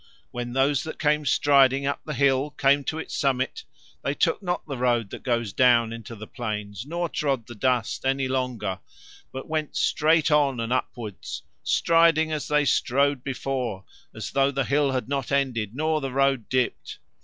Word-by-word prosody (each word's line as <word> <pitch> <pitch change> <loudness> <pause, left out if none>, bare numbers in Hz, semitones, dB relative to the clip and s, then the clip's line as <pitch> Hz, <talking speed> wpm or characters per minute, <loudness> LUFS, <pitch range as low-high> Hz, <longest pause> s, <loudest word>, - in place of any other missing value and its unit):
When 120 0 -5
those 135 +1 +2
that 160 - -7
came 150 -1 +1
striding 140 -1 +4
up 140 - -2
the 150 - -5
hill 140 +1 +2
came 140 -1 +2
to 160 - -2
its 160 - -6
summit 135 - -1 0.4
they - - -1
took - - +1
not 180 -2 -2
the 135 -4 -6
road 120 -4 +1
that - - -7
goes 115 -5 -1
down 120 -3 +4
into 115 0 -8
the 110 0 -9
plains 105 -1 -5
nor 170 +2 -2
trod 135 -7 -1
the 120 - -10
dust 120 -1 0
any 135 0 +1
longer, 125 -7 -2 0.5
but 130 - -7
went 155 -1 -3
straight 155 +1 +2
on 140 -4 +3
and 115 +1 -1
upwards, 115 -5 -4 0.2
striding 165 -1 +3
as 155 -2 -3
they 150 -1 +2
strode 140 0 +1
before, 125 -7 -3 0.3
as - - -7
though 135 0 +3
the 135 -1 -1
hill 140 +2 +2
had 130 -2 -2
not 135 -1 -3
ended 125 -6 0
nor 155 +1 0
the 135 -1 -3
road 135 -3 +1
dipped. 130 -1 -1
135 Hz, 180 wpm, -25 LUFS, 120-145 Hz, 0.5 s, striding